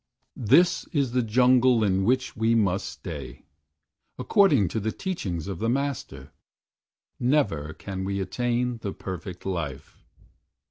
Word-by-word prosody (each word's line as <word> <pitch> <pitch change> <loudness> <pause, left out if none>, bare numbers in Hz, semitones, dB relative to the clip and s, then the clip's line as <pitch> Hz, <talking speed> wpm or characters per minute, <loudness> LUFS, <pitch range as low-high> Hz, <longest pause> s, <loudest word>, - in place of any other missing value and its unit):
"This 165 - +3
is 140 -5 0
the 125 +1 +2
jungle 125 +1 +4
in 95 -2 +2
which 130 +3 +1
we 115 +1 +2
must 100 -5 +1
stay, 70 -1 -8 0.7
According 150 - +4
to 110 - -2
the 110 +1 -2
teachings 95 - -4
of 95 -4 -5
the 115 - 0
Master, 140 +2 -3 0.9
Never 100 - +1
can 95 -1 -6
we 100 +1 -2
attain 120 +4 -1
the 100 -3 -4
Perfect 95 0 -7
Life. 85 -8 -5
110 Hz, 130 wpm, -26 LUFS, 95-125 Hz, 0.9 s, jungle